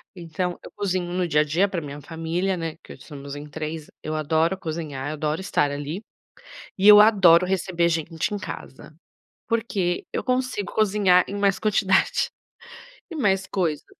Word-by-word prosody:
Então, 175 +1 -4
eu - - -11
cozinho 185 -3 -2
no 180 0 0
dia 150 -1 +3
a - - +3
dia 170 +7 +1
pra 180 -4 -3
minha 145 0 -7
família, 165 +5 -2
né, 165 -2 -4
que - - -11
hoje - - -16
somos 140 -2 -9
em 145 +1 -8
3 155 0 -5 0.2
eu 155 0 -3
adoro 160 +4 +1
cozinhar, 155 -6 -5
eu - - -3
adoro 155 +3 -2
estar, 145 -6 0
ali. 145 +7 -5 0.8
E 195 - +2
eu 210 0 +10
adoro 190 -5 +6
receber 180 -2 0
gente 165 +3 -2
em 205 - -2
casa, 155 -5 -9 0.5
porque 210 -6 -1
eu - - -1
consigo 255 -5 -1
cozinhar 200 -4 +4
em 200 - -5
mais 200 -1 +2
quantidade, 200 -3 +2 0.8
e 330 - -7
mais 195 -8 +1
coisas. 165 -6 -1
175 Hz, 170 wpm, -24 LUFS, 155-195 Hz, 0.8 s, eu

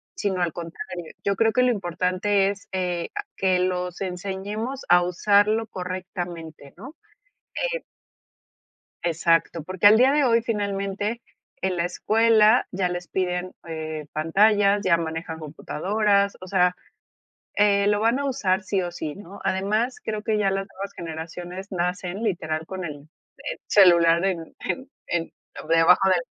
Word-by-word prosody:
sino 190 -3 -1
al 170 -2 +1
contrario. 170 0 -7
Yo 200 0 +1
creo 225 -1 +3
que 250 - +3
lo 250 - +4
importante 190 +1 +1
es, 200 0 -7
eh, 180 -2 -2
a 410 - -2
que 185 -1 +2
los 180 0 -2
enseñemos 200 +7 -4
a 175 0 +6
usarlo 205 +5 +2
correctamente, 175 -5 -6
¿no? 265 - -10 0.8
Eh - - -3 1.2
Exacto, 165 -1 +1
porque 185 +2 +1
al 215 - +7
día 260 +4 +5
de 295 0 +3
hoy 230 -2 +3
finalmente 205 +1 -2 0.4
en 190 -1 -1
la 170 - 0
escuela 220 +4 +4
ya 180 -1 0
les 175 0 -5
piden, 180 0 -2
eh, 155 -2 -5
pantallas, 200 +5 +3
ya 170 -2 +4
manejan 165 0 -4
computadoras, 200 +6 0
o 185 - -9
sea, 180 -1 +2 0.8
eh, 200 -1 +3
lo 205 0 +2
van 230 +4 +2
a - - -2
usar, 205 -8 0
sí, 190 0 -1
o, 175 - -3
sí, 155 -3 -5
¿no? 200 0 -11
Además, 215 +6 0
creo 215 -1 -3
que 215 -1 0
ya 195 -2 +2
las 195 0 -2
nuevas 200 +1 -6
generaciones 175 +4 -7
nacen 180 +3 -2
literal 160 -6 -2
con 190 -2 -6
el 150 -1 -8 0.6
celular 170 -3 +5
en 170 -4 -2
en 265 0 -4 0.2
en 170 -1 -2 0.4
debajo 165 +4 +5
del 180 -2 +3
185 Hz, 150 wpm, -24 LUFS, 175-205 Hz, 1.2 s, al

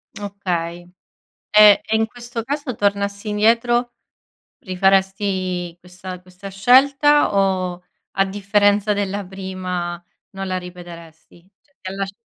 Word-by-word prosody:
Okay. 175 -4 -4 0.6
E 210 -1 +8
e 220 - 0
in 220 0 +2
questo 240 0 -7
caso 280 0 -4
tornassi 200 +1 -1
indietro 235 +3 +2 0.7
rifaresti 190 -2 0
questa 180 +1 -10
questa 185 +2 -11
scelta 270 +7 +4
o 185 -2 0 0.3
a 195 - +1
differenza 205 +1 +2
della 200 0 -3
prima 185 -2 -5 0.3
non 195 0 -6
la 185 0 -2
ripeteresti? 175 -1 -12
Cioè, 285 - -37
ti 185 - -7
ha - - -7
lasc 195 0 -4
195 Hz, 115 wpm, -20 LUFS, 180-210 Hz, 0.7 s, E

